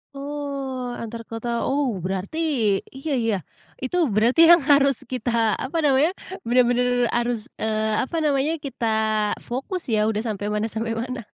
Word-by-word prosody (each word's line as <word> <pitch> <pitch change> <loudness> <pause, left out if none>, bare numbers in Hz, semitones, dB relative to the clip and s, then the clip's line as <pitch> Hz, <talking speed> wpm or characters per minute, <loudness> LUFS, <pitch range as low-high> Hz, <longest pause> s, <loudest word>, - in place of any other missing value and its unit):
Oh 275 -3 -4
antar 230 0 -7
kota, 235 +1 -3
oh 270 -8 0
berarti 190 - -3 0.6
iya 285 +3 -5
iya 225 -3 +1 0.5
itu 360 +8 -1 0.2
berarti 240 +9 +4
yang 345 -2 +8
harus 280 -2 +4
kita 245 -1 -3 0.3
apa 275 +6 -3
namanya, 285 +4 +4 0.4
benar-benar 245 0 +3 0.3
harus, 240 -1 0 0.2
eee, 220 0 0
apa 330 - -6
namanya 290 +1 +1
kita 240 -4 -3 0.6
fokus 270 +9 -4
ya, 215 0 +2
udah 215 +1 -1
sampai 205 -2 -3
mana 210 +1 0
sampai 225 +1 -2
mana. 245 +1 -4
245 Hz, 145 wpm, -23 LUFS, 225-275 Hz, 0.6 s, yang